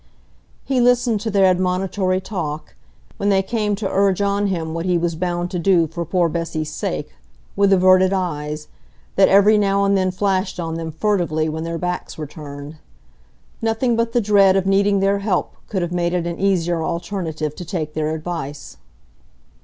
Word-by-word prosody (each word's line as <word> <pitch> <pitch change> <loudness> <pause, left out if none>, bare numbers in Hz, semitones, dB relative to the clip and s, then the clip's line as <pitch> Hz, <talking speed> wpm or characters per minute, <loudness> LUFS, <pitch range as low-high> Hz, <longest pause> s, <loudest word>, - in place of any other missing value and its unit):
He 265 -2 +1
listened 240 -3 +3
to 220 - -2
their 200 -2 +3
admonitory 185 +1 +1
talk, 160 -6 -5 0.4
when 200 - 0
they 195 -1 +3
came 210 0 -1
to 200 0 -3
urge 195 -1 +2
on 200 0 +1
him 165 -4 -2
what 165 +2 -3
he 180 -1 +2
was 170 0 -1
bound 175 +1 -2
to 180 - -2
do 175 -2 +3
for 170 +2 -5
poor 175 +1 +1
Bessy's 160 -2 -3
sake, - - -4 0.4
with 200 0 +3
averted 185 0 +5
eyes, 150 -5 -3 0.5
that 190 - +5
every 205 +2 +5
now 200 -1 +2
and 200 0 +3
then 185 -1 +2
flashed 185 0 -1
on 165 -1 -3
them 165 0 -4
furtively 165 -4 0
when 160 +1 -3
their 165 0 -3
backs 180 +1 -4
were 155 - -4
turned. 145 0 -9 0.8
Nothing 225 +2 +1
but 230 0 0
the 240 - +2
dread 200 -2 +4
of 190 -1 +1
needing 200 0 +3
their 200 +1 +2
help 200 -1 -1
could 190 -4 -2
have 175 - -3
made 175 0 0
it 175 -1 -1
an 170 0 -4
easier 175 -4 +1
alternative 165 -4 -3
to 180 - -7
take 160 -4 -4
their 155 0 -1
advice. 155 -3 -6
185 Hz, 180 wpm, -20 LUFS, 165-200 Hz, 0.8 s, averted